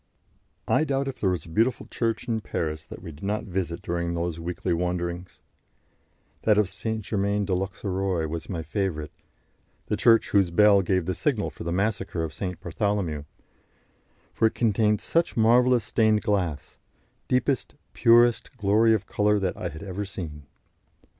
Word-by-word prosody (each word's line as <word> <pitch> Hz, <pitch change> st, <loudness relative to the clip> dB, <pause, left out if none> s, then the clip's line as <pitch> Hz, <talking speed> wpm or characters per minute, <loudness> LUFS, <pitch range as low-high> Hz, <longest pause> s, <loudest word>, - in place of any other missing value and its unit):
I -, -, +3 dB
doubt 140 Hz, -2 st, -1 dB
if 135 Hz, -, -5 dB
there 95 Hz, -, +2 dB
was 90 Hz, -4 st, -2 dB
a -, -, -12 dB
beautiful 115 Hz, +9 st, +1 dB
church 115 Hz, -1 st, -2 dB
in 115 Hz, -2 st, -1 dB
Paris 80 Hz, -4 st, -3 dB
that -, -, -10 dB
we 85 Hz, -, -7 dB
did 75 Hz, -, -14 dB
not 105 Hz, +2 st, -1 dB
visit 90 Hz, -3 st, -3 dB
during 85 Hz, 0 st, -2 dB
those 85 Hz, -1 st, -2 dB
weekly 90 Hz, +1 st, -2 dB
wanderings; 90 Hz, +1 st, -3 dB, 1.0 s
that 105 Hz, -2 st, +3 dB
of 105 Hz, -3 st, +3 dB
St. 110 Hz, +3 st, -4 dB
Germain 100 Hz, 0 st, 0 dB
de 95 Hz, -, -1 dB
l'Auxerrois 95 Hz, -2 st, -1 dB
was 80 Hz, +1 st, -6 dB
my 85 Hz, -4 st, -3 dB
favourite 80 Hz, -5 st, -2 dB, 0.7 s
the -, -, -1 dB
church 115 Hz, -1 st, +4 dB
whose 100 Hz, -3 st, +4 dB
bell 100 Hz, +3 st, +5 dB
gave 95 Hz, -1 st, 0 dB
the 95 Hz, -, -1 dB
signal -, -, -1 dB
for -, -, -9 dB
the 85 Hz, -, -3 dB
massacre 95 Hz, -2 st, -1 dB
of 80 Hz, -1 st, -4 dB
St. 90 Hz, 0 st, -5 dB
Bartholomew 90 Hz, -4 st, -2 dB, 1.1 s
for 115 Hz, -, +3 dB
it -, -, -4 dB
contained 105 Hz, -2 st, +2 dB
such 170 Hz, -4 st, 0 dB
marvellous 120 Hz, +1 st, +4 dB
stained 110 Hz, -1 st, +2 dB
glass, 90 Hz, -9 st, -1 dB, 0.5 s
deepest, 130 Hz, 0 st, 0 dB, 0.2 s
purest 120 Hz, +2 st, +4 dB
glory 110 Hz, +2 st, +4 dB
of 100 Hz, -2 st, -3 dB
colour 105 Hz, 0 st, +2 dB
that 95 Hz, -3 st, -1 dB
I 90 Hz, -, -4 dB
had 80 Hz, +3 st, -9 dB
ever 100 Hz, +1 st, -4 dB
seen. 75 Hz, -7 st, -7 dB
95 Hz, 165 wpm, -26 LUFS, 85-110 Hz, 1.1 s, bell